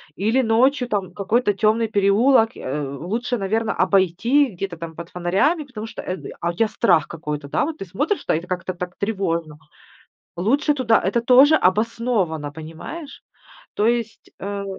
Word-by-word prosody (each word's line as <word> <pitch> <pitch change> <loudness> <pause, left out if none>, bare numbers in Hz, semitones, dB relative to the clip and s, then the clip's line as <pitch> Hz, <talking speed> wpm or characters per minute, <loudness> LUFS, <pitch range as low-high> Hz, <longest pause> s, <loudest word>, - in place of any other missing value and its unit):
Или 220 +7 +1
ночью 250 +3 +2
там 195 -5 -2
какой-то 205 +3 +1
темный 220 +3 +1
переулок, 220 +4 +4
э, 145 +3 -4
лучше, 215 - -3
наверно, 220 +3 -1
обойти 195 - +3
где-то 180 -1 -5
там 165 0 -8
под 170 +1 -8
фонарями, 190 - +1
потому 225 -4 -7
что, - - -8
э, 185 - -4 0.2
а 170 - -1
у - - -10
тя 225 +5 +1
страх 165 -10 +2
какой-то, 150 -3 -6
да, - - +1
вот 315 0 -5
ты - - -5
смотришь, 290 - -2
та, - - +1
а - - +2
это 175 - -7
как-то 185 0 -3
так 180 0 -6
тревожно. 170 -7 -2 0.8
Лучше 275 - +1
туда 250 -5 +3
это 215 +6 0
тоже 265 +6 +6
обосновано, 200 - 0
понимаешь? 160 - -9 0.5
То 210 - +1
есть, 235 -2 -2
э, 200 0 -4
205 Hz, 165 wpm, -22 LUFS, 175-235 Hz, 0.8 s, тоже